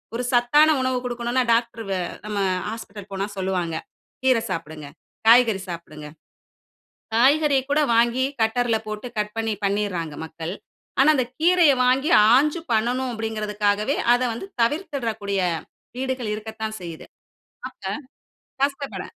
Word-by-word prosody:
ஒரு 245 - -2
சத்தான 250 +6 +5
உணவு 260 0 0
குடுக்கணும்னா, 240 +1 0
டாக்டர் 230 -1 -1
வெ 190 - 0 0.3
நம்ம 210 -1 -3 0.3
ஹாஸ்பிட்டல் 210 -2 -8
போனா 195 +1 -2
சொல்லுவாங்க, 185 -3 -1 0.5
"கீரை 255 -3 +4
சாப்டுங்க. 155 -4 -5 0.4
காய்கறி 230 -4 +6
சாப்டுங்க". 155 -3 -8 1.1
காய்கறிய 280 +3 +4
கூட 295 - +3 0.2
வாங்கி, 235 +3 +3 0.2
கட்டர்ல 225 +1 +2
போட்டு 215 +3 -5
கட் 210 +1 -3
பண்ணி 225 -1 -1
பண்ணிட்றாங்க 195 -6 -1
மக்கள். 160 +2 -6 0.5
ஆனா, 275 - +6
அந்த 255 -3 +1
கீரைய 340 -2 +5
வாங்கி 265 +5 +2 0.3
ஆஞ்சு 300 +5 +2
பண்ணணும் 245 +4 0
அப்டீங்குறதுக்காகவே, 210 +1 -1 0.2
அத 245 - +2
வந்து 235 +12 -7 0.2
தவிர்த்துட்றக்கூடிய 230 - -2 0.6
வீடுகள் 255 -4 -2
இருக்கத்தான் 220 0 -6
செய்யிது. 165 -2 -8 0.6
ஆக, 215 - -26 0.8
கஷ்டப்பட 280 0 -2
225 Hz, 120 wpm, -23 LUFS, 205-260 Hz, 1.1 s, காய்கறி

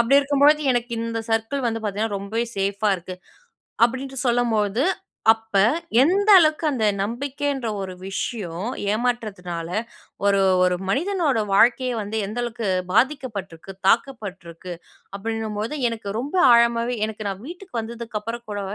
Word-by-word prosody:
அப்படி 265 +4 +5
இருக்கும்பொழுது 285 +2 +4
எனக்கு 240 0 -2
இந்த 230 0 -3
சர்க்கிள் 225 +4 0
வந்து 225 0 -2
பார்த்தீங்கன்னா, 205 0 -1
ரொம்பவே 220 +4 -2
சேஃப்பா 200 +2 0
இருக்கு". 185 +2 -8 0.7
அப்படின்ட்டு 260 +2 -2
சொல்லும்போது, 230 -1 +1 0.5
அப்ப 225 -2 -6 0.5
எந்த 395 +7 +2
அளவுக்கு 310 -1 +2
அந்த 235 -6 -1 0.2
நம்பிக்கை 265 +7 -3
என்ற 245 -4 -3
ஒரு 185 -1 -5
விஷயம், 195 -1 -4 0.2
ஏமாற்றத்துனால 200 -8 -3 0.6
ஒரு 200 -1 +4 0.2
ஒரு 180 0 +2
மனிதனோட 320 - +1
வாழ்க்கையே 250 +5 +4
வந்து 210 +1 -4
எந்த 215 +4 -6
அளவுக்கு 235 -3 -3 0.2
பாதிக்கப்பட்டிருக்கு, 215 - -1
தாக்கப்பட்டிருக்கு, 190 -8 -1 0.4
அப்படின்னும்பொழுது 220 +3 -3
எனக்கு 225 -3 -6
ரொம்ப 285 +9 -3 0.2
ஆழமாவே 235 +1 +3
எனக்கு 215 -1 -6
நான் 195 +2 -5
வீட்டுக்கு 355 -6 -7
வந்ததுக்கு 230 -1 -5
அப்புறம் 235 +2 -6
கூட, 205 -1 -3
225 Hz, 130 wpm, -23 LUFS, 200-255 Hz, 0.7 s, அப்படி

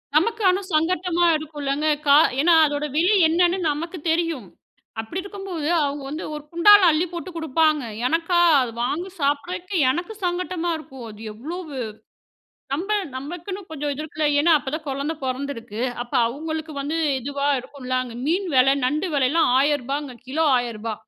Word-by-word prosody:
நமக்கு 445 +8 +2
ஆனா 370 +2 +1
சங்கட்டமா 345 +2 +1
இருக்குலங்க. 295 -1 -3 0.2
கா 280 -1 +6 0.3
ஏன்னா 340 +3 +5
அதோட 290 0 -2
விலை 355 +7 +4
என்னன்னு 350 +3 +2
நமக்குத் 330 +2 -6
தெரியும். 325 - -1 0.5
அப்டி 225 +12 -5
இருக்கும்போது 390 -6 -5 0.2
அவங்க 285 0 -2
வந்து 305 +4 -5
ஒரு 300 - -7
குண்டால 410 +5 +7
அள்ளிப் 325 +3 0
போட்டு 345 +1 -6
குடுப்பாங்க. 315 -2 +1 0.2
எனக்கா, 335 +4 +1 0.2
அத 245 -2 -2
வாங்கி 335 +9 -2
சாப்பிடறக்கு 350 +7 -2
எனக்கு 350 +10 -2
சங்கடமா 355 -1 -1
இருக்கும். 265 -5 -11
அது 210 0 -12
எவ்ளோவு 305 +5 -7 1.0
நம்மள் 395 +8 0
நமக்குன்னு 350 +8 -6
கொஞ்சம் 295 -2 -3
இது 295 - -5
இருக்கு. 310 0 -2
ஏன்னா 330 +3 +4
அப்ப 270 - -6
தான் 315 -1 -11
குழந்த 280 +4 -2
பொறந்துருக்கு. 255 -4 -4 0.2
அப்ப 245 - -11
அவங்களுக்கு 315 +4 -5
வந்து 300 +4 -2 0.2
இதுவா 280 +2 -2
இருக்கும். 255 0 -11
அங்க 240 -2 -8
மீன் 365 +4 0
வெல, 255 +1 +6 0.2
நண்டு 305 +7 -1
வெலலாம் 280 +3 +3
ரூ.1,000 280 -1 0
கிலோ 315 +4 +1
ரூ.1,000 230 -2 -4
310 Hz, 150 wpm, -23 LUFS, 280-345 Hz, 1.0 s, குண்டால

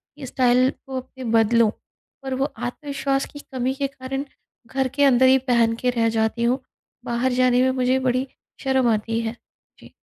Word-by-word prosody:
कि 295 - -8
स्टाइल 255 0 +3
को 265 -3 -8
अपने 260 +1 -11 0.2
बदलूँ, 225 0 +3 0.5
पर 265 -1 -3
वो 270 - +1
आत्मविश्वास 275 +3 -2
की 290 - -8
कमी 260 -2 -3
के 275 0 -1
कारण 270 0 -5 0.4
घर 265 +1 -1
के 285 - +3
अंदर 260 -2 +5
ही 265 +1 +6
पहन 230 -1 +3
के 250 +2 -1
रह 230 -2 +1
जाती 220 +1 0
हूँ, 250 +3 +2 0.5
बाहर 240 +2 0
जाने 250 0 +3
में 260 0 +3
मुझे 255 0 +1
बड़ी 260 +1 0 0.4
शर्म 265 -2 +2
आती 225 +2 -1
है, 225 +1 -4 0.4
जी। - - -16
255 Hz, 180 wpm, -23 LUFS, 240-265 Hz, 0.5 s, ही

